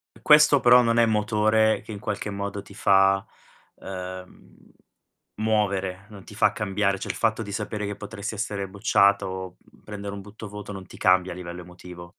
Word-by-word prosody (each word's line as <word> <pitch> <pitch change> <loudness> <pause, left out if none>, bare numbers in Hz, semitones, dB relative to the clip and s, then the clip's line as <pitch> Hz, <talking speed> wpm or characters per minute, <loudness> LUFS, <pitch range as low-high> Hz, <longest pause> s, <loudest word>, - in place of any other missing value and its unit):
E - - -19
questo 150 -2 +6
però 125 0 +7
non 115 0 +1
è 115 - +5
motore 110 0 +2
che - - -11
in 100 - -7
qualche 105 0 -4
modo 100 0 -4
ti 100 - -15
fa, 95 -1 +3 0.5
uhm, 95 -1 -9 0.8
muovere, 100 -3 -1
non 100 -3 -12
ti - - -13
fa 105 0 +3
cambiare, 100 -1 -1
cioè, - - -6
il - - -2
fatto 115 0 0
di 100 - -8
sapere 105 +1 -4
che 100 0 -4
potresti 105 +1 -6
essere 100 -2 -3
bocciata 100 0 +2
o 95 -1 -7 0.3
prendere 100 -1 -7
un 100 - -7
butto 105 +2 -10
voto 105 0 -8
non 95 -2 -9
ti - - -13
cambia 90 0 +3
a - - -10
livello 90 -1 -8
emotivo. 90 0 -12
100 Hz, 185 wpm, -25 LUFS, 95-105 Hz, 0.8 s, però